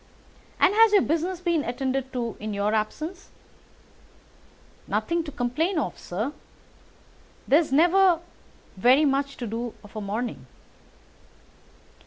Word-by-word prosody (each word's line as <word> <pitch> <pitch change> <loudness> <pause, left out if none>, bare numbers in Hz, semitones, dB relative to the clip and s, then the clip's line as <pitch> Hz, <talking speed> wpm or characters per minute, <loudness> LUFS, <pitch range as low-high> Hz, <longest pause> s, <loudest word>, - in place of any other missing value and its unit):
"And - - +5
has 445 0 +5
your 405 - +6
business 340 +3 -1
been 340 -4 +1
attended 265 +1 -2
to 235 -3 -3
in 215 0 -4
your 205 +1 0
absence?" 310 - -3 1.6
"Nothing 335 0 0
to 295 - -6
complain 290 +8 -1
of, 305 - -2
sir. 215 +11 -4 1.1
There's 300 +1 +3
never 350 +4 +5 0.6
very 255 +9 +5
much 275 0 0
to 245 - -5
do 230 +2 -4
of 205 +1 -16
a 215 - -4
morning." 205 - -4
275 Hz, 120 wpm, -25 LUFS, 230-335 Hz, 1.6 s, your